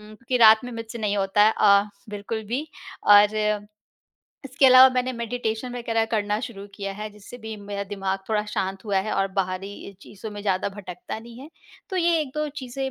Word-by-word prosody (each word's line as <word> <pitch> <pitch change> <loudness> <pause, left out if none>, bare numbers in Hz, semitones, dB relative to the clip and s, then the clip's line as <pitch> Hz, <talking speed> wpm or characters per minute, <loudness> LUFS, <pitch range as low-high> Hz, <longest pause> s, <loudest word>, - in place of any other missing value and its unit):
क्योंकि 235 +3 -2
रात 220 -1 +7
में 245 - -7
मुझसे 230 0 -7
नहीं 205 -1 -1
होता 195 +1 +3
है 220 - +4
अ, 200 0 +6 0.3
बिल्कुल 210 +2 -5
भी 255 +8 -3 0.4
और 210 0 +4 0.8
इसके 275 +1 +3
अलावा 255 0 +9
मैंने 255 0 0
मेडिटेशन 235 0 -4
वगैरह 225 -2 0
करना 210 -1 0
शुरू 215 -5 -7
किया 200 -1 -5
है 210 +2 -6
जिससे 210 +4 -13
भी 220 -1 -7
मेरा 200 -1 -5
दिमाग 195 -1 -3
थोड़ा 210 -1 0
शांत 190 -2 -3
हुआ 200 -2 -1
है - - -2
और 195 - +1
बाहरी 195 +1 -4
चीज़ों 210 +2 -9
में 205 0 -7
ज़्यादा 190 -2 0
भटकता 195 -1 -8
नहीं 230 +1 -12
है। 280 - -10 0.4
तो 380 - -3
ये 340 -2 +2
1-2 300 +1 -3
चीज़ें 265 +1 -4
215 Hz, 185 wpm, -24 LUFS, 200-245 Hz, 0.8 s, अलावा